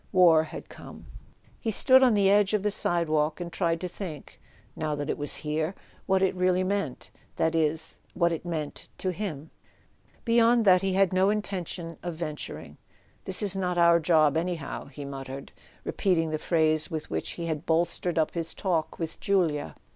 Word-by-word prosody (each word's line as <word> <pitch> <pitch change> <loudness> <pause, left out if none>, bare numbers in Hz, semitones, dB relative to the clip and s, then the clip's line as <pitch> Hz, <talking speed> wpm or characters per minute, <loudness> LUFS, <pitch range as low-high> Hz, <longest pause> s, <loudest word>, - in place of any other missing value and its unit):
War 170 -4 +6
had - - -9
come. - - -12 0.5
He 225 - -2
stood 260 +5 +5
on 250 -4 +5
the 200 -1 +4
edge 205 +1 +4
of 205 - -1
the 210 - +1
sidewalk, 160 -5 0
and 175 -1 -6
tried 170 -2 0
to 180 - -2
think—now 155 -3 -7
that 145 0 -2
it - - -3
was 145 - +1
here—what 160 +5 -2
it 190 - +2
really 185 0 +2
meant: 190 -8 -3 0.2
that 160 0 +1
is, 160 0 0 0.2
what 170 -1 +2
it 165 - -3
meant 160 -4 -5
to 185 - -2
him. 165 -6 -5 0.7
Beyond 235 0 +4
that 185 -2 +6
he 195 -1 0
had 190 -1 +3
no 190 +1 +3
intention 185 -5 -4
of 175 -2 -5
venturing. 155 -2 -6 0.5
"This 190 +2 +2
is 200 -2 0
not 180 -2 -1
our 170 0 +6
job 155 -3 +3
anyhow," 170 -3 -3
he 145 0 -9
muttered, 135 0 -7 0.3
repeating 165 -5 0
the 155 - -2
phrase 155 -1 +1
with 160 -3 -5
which 80 0 -3
he 170 - -5
had 160 -1 -3
bolstered 170 +1 0
up 160 -1 +2
his 165 -1 -2
talk 170 -5 -1
with 165 -2 -5
Julia. 160 - 0
170 Hz, 175 wpm, -27 LUFS, 155-190 Hz, 0.7 s, War